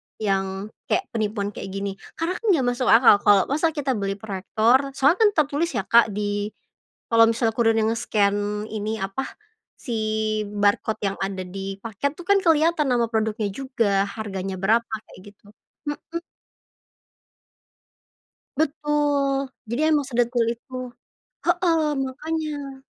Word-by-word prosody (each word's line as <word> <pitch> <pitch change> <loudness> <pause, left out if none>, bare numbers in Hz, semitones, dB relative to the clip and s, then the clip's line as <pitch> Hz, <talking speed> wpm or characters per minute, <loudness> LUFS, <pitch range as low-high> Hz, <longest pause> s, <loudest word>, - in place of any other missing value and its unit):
yang 195 0 -2 0.2
kayak - - +1
penipuan 210 -2 -2
kayak - - -7
gini, 200 0 -2 0.2
karena 335 +3 -2
kan 460 - -10
gak 260 -4 0
masuk 245 +1 -2
akal, 230 -2 +7
kalau 205 -2 +5
masa 310 +3 +2
kita 280 -2 -1
beli 200 -4 -1
proyektor, 220 +7 +1
soalnya 340 - +4
kan - - +5
tertulis 295 +4 -1
ya, 195 - 0
Kak 230 +4 +5
di 205 0 -1 0.6
kalau 230 0 +7
misalnya 230 -1 +1
kurirnya 225 -1 +3
nge-scan, 210 -2 0
ini 215 +1 -2
apa 195 +7 -3 0.5
si 240 - -6 0.6
barcode 205 +1 +1
yang 195 - -3
ada 195 -1 -3
di 195 +1 -6
paket 230 +6 -2
tuh 350 - -8
kan 400 0 +6
kelihatan 320 -2 +3
nama 240 -2 +2
produknya 220 -1 0
juga 220 -6 0
harganya 195 -3 -4
berapa 225 +4 +2 0.2
kayak - - -15
gitu, 205 - -34 0.4
mhm. 325 +3 -5 2.4
Betul, 290 -3 0 0.2
jadi 305 +8 +1
emang 290 -3 +2
sedetail 240 -1 +1
itu 240 - -37 0.7
heeh, 330 -3 +2 0.2
makanya. 290 -1 -5
230 Hz, 135 wpm, -23 LUFS, 205-280 Hz, 2.4 s, akal